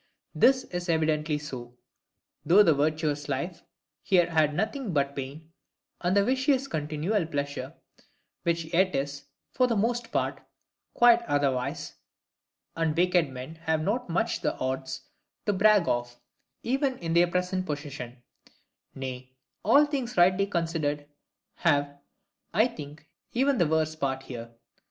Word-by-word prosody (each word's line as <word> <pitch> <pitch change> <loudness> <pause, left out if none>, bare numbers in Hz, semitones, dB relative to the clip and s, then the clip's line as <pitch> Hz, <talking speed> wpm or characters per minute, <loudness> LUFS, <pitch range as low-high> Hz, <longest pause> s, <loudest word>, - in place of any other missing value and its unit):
This 260 0 +4
is 175 0 -5
evidently 155 -2 +1
so, 125 -5 -8 0.7
though 185 +7 +6
the 165 -5 +5
virtuous 150 0 0
life 165 +6 -3 0.4
here 175 -3 +3
had 155 -2 +2
nothing 220 - -2
but 140 -1 0
pain, 145 +4 -7 0.5
and 185 +2 +2
the 200 - +4
vicious 265 +2 +2
continual 155 - -1
pleasure: 140 -3 -4 0.7
which 165 -1 -1
yet 185 +2 +3
is, 140 0 -3 0.3
for 255 0 +2
the 235 - 0
most 235 +2 0
part, - - -1 0.5
quite 240 -1 +6
otherwise, 135 -3 -1 0.8
and 165 -1 0
wicked 180 -3 +3
men 130 +5 -8
have 160 -1 +1
not 225 +5 -1
much 205 +8 0
the - - -1
odds 130 0 -3 0.4
to 205 - +2
brag 205 -2 +4
of, 120 0 -2 0.4
even 265 +1 0
in 165 -1 -3
their 175 +1 +5
present 180 +1 -1
possession; 140 -5 -6 0.7
nay, 130 -1 -6 0.3
all 285 +8 +6
things 265 -6 -3
rightly 185 +3 +4
considered, 165 -5 -1 0.5
have, 145 -3 +1 0.6
I 220 +5 +5
think, 150 -6 -10 0.3
even 265 +2 +2
the 170 - +4
worse 155 0 +1
part 135 -3 -2
here. 120 -3 -7
160 Hz, 135 wpm, -28 LUFS, 145-200 Hz, 0.8 s, though